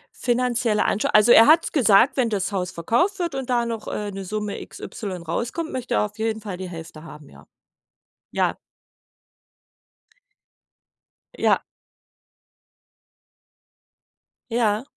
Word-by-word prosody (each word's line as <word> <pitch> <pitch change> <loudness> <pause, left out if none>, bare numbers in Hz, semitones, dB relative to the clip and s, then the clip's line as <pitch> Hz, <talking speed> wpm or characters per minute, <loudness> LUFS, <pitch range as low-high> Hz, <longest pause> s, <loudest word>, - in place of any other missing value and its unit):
Finanzielle 240 -3 0
Ansch 210 - 0
also, 215 +3 +5
er 225 - +8
hat's 325 +2 +5
gesagt, 240 -1 +4
wenn 245 -3 +2
das 205 -1 -2
Haus 185 -2 -2
verkauft 240 - 0
wird 345 -3 -2
und 265 -1 -5
da 240 -1 +1
noch, 230 -2 -5
äh, 205 -1 -4
'ne 195 0 -6
Summe 210 +1 -4
XY 185 -6 -7
rauskommt, 245 - -3
möchte 250 -1 -3
er - - +2
auf 210 +1 -10
jeden 220 0 -1
Fall 205 -4 -7
die 185 0 -6
Hälfte 165 -2 -10
haben, 150 -3 -12
ja. - - -17 0.9
Ja. - - 0 2.8
Ja. - - +3 2.9
Ja. 225 -1 +1
220 Hz, 125 wpm, -23 LUFS, 195-245 Hz, 2.9 s, er